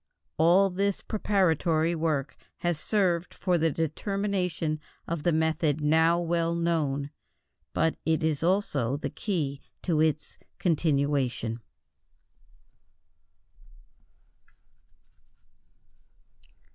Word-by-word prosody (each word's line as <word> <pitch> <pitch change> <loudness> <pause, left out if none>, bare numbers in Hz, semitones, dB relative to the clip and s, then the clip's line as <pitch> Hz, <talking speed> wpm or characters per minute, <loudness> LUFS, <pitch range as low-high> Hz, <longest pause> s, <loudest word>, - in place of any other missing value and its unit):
All 180 +4 +5
this 200 +2 -1
preparatory 170 -6 +1
work 155 -4 -1 0.3
has 175 -3 0
served 180 -2 0
for 180 -2 +1
the 165 +1 +3
determination 175 0 -1 0.3
of 165 -2 -2
the 175 - +2
method 160 -1 +1
now 160 +3 +3
well 170 -1 0
known, 150 -5 0 0.6
but 160 - +1
it 160 0 +1
is 155 -3 0
also 155 - +1
the - - -4
key 150 -10 -2 0.2
to 165 -4 +1
its 155 -1 -1 0.2
continuation. 140 -8 0
160 Hz, 85 wpm, -28 LUFS, 150-175 Hz, 0.6 s, All